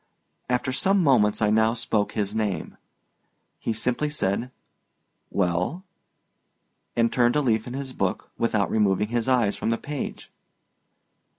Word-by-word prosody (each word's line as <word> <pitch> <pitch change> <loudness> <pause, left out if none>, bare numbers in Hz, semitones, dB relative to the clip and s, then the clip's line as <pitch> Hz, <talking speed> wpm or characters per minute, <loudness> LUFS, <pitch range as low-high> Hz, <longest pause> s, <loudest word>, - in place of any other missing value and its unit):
After 125 +1 0
some 190 +8 +2
moments 110 -7 +3
I 105 - +3
now 110 +1 +3
spoke 110 -3 -1
his 105 -1 -2
name. 105 -4 -2 0.8
He - - -2
simply 125 +6 0
said, 120 -4 -1 0.8
"Well," 90 - 0 1.1
and 115 0 +2
turned 120 0 +3
a 150 - +3
leaf 110 -3 +1
in 125 - -6
his 135 -1 -5
book - - -2
without 105 -6 0
removing 105 -1 +2
his 120 0 -1
eyes 120 -6 +3
from - - -2
the 115 - +1
page. 145 +1 -6
115 Hz, 135 wpm, -25 LUFS, 105-130 Hz, 1.1 s, moments